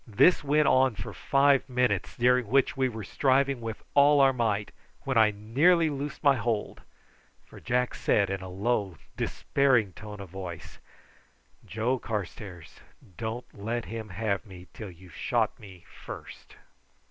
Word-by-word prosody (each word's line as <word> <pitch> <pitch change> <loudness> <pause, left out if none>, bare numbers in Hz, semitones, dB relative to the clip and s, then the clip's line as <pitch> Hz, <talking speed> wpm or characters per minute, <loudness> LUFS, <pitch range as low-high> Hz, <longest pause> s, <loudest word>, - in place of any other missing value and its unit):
This 135 - +4
went 150 +1 +3
on 130 -3 +4
for 95 - -7
five 140 -1 +2
minutes, 125 0 0
during 125 -1 +3
which 135 +5 +2
we 130 -1 +1
were 110 -2 -7
striving 135 +3 +1
with 115 -1 -6
all 145 +1 +6
our 135 -1 +5
might, 105 -4 -1 0.3
when 130 - -2
I 110 -2 +6
nearly 145 - +2
loosed 145 +2 -5
my 140 -2 +5
hold, 115 -2 -2 0.6
for - - -14
Jack 125 +1 0
said 100 -2 +1
in 95 -1 -3
a 95 - -7
low 100 -2 -1 0.2
despairing 125 -9 +1
tone 105 +1 -9
of 100 -2 -9
voice: 90 -3 -8 0.8
"Joe 120 +5 -1
Carstairs, 100 -5 -6 0.4
don't 115 +4 -4
let 115 +3 -4
him 110 -1 -6
have 100 +1 -2
me 95 -5 -12
till 105 -3 -8
you've 90 0 -15
shot - - -1
me 95 -5 -14 0.2
first." - - -10
115 Hz, 150 wpm, -28 LUFS, 100-135 Hz, 0.8 s, all